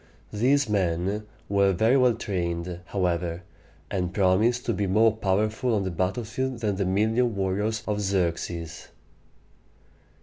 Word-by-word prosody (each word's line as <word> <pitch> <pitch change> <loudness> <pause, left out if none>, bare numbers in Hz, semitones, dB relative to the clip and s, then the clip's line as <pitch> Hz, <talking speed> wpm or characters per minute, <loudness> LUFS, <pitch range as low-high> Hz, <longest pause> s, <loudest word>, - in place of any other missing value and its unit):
These 135 +6 +2
men 100 +1 -1 0.2
were 100 -1 +3
very 110 +8 +3
well 125 -3 +4
trained, 85 -4 -3
however, 90 -2 -1 0.5
and 90 -3 -1
promised 105 +6 +2
to 115 - 0
be 100 -2 -1
more 110 +3 +4
powerful 110 +3 0
on 100 - 0
the 95 - -2
battlefield 115 +8 -2
than 105 -4 0
the 100 - 0
million 110 +5 +1
warriors 105 +3 -1
of 105 -1 -1
Xerxes. 85 -4 -2
100 Hz, 130 wpm, -26 LUFS, 90-110 Hz, 0.5 s, well